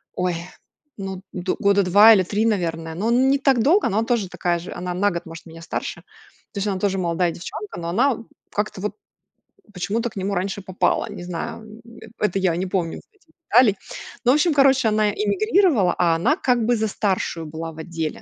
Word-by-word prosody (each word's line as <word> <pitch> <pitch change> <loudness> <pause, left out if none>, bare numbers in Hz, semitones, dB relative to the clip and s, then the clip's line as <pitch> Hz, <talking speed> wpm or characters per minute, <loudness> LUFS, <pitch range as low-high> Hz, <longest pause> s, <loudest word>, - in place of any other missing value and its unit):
ой, 180 -1 0 0.6
ну, 195 -1 -6
д 180 0 -2
года 200 0 +3
2 205 +5 +7
или 190 -3 +4
3, 210 +5 -1
наверное, 165 -6 -1
но 215 +6 -1
не 265 +3 +4
так 265 -4 +3
долго, 345 - +4
но 215 +1 +1
она 225 - 0
тоже 230 -5 0
такая 175 -1 -1
же. 175 - -8
Она 180 0 -4
на 205 +3 +1
год 170 - -5
может 165 +1 -10
меня 165 0 -12
старше. - - -5 0.5
То - - -9
есть 200 - -1
она 195 -2 -1
тоже 195 0 0
молодая 170 -1 0
девчонка, 205 +5 -7
но 170 0 -4
она, 245 +10 +3
м, 230 0 -10 0.2
как-то 210 -2 -3
вот 210 - -3 0.8
почему-то 225 +6 -2
к - - -15
нему 195 +1 -2
раньше 195 +2 -2
попала. 185 0 0
Не 175 - -8
знаю, 175 +4 -5 0.2
м, 230 -1 -14 0.2
это 195 -2 0
я 185 -3 +1
не 185 - -2
помню 180 -3 -2
вот - - -13
этих 335 -5 -31 0.2
деталей. 230 -3 +5 0.5
Ну 250 - +6
в - - +4
общем, 310 +2 +3
короче, 270 -4 +4
она 215 0 +2
эмигрировала, 230 - +2
а 170 -2 +3
она 235 - +2
как 245 -2 +1
бы 240 +1 +3
за 220 -1 0
старшую 185 -5 -2
была 160 +1 -6
в 160 - -13
отделе. 160 -1 -4
195 Hz, 210 wpm, -22 LUFS, 175-230 Hz, 0.8 s, 2